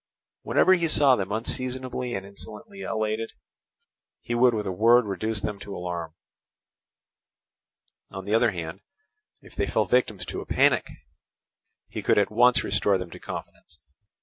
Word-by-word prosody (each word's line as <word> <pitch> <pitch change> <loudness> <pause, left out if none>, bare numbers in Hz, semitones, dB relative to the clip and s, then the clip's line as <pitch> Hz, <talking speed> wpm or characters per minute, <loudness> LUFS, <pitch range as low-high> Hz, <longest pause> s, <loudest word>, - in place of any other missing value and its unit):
Whenever 185 - +4
he 170 -2 +2
saw 145 -4 +5
them 100 -3 -3
unseasonably 125 +2 -3
and 95 0 -5
insolently 105 - -8
elated, 110 - -2 0.9
he 120 - -5
would 120 +1 +5
with 105 -2 -2
a 95 - -2
word 115 +5 +5
reduce 105 +2 -2
them 105 0 -4
to 100 0 -8
alarm; 85 -2 -5 1.9
on 95 0 -8
the 105 - -2
other 115 +1 +4
hand, 85 -1 -6 0.6
if - - -16
they - - -1
fell - - +1
victims 110 -7 +1
to - - -5
a - - -9
panic, - - +3 1.0
he - - -6
could - - +2
at 100 0 +2
once 120 +3 +4
restore 100 -2 +1
them 90 -2 -7
to - - -10
confidence. 80 - -9
110 Hz, 150 wpm, -26 LUFS, 95-125 Hz, 1.9 s, saw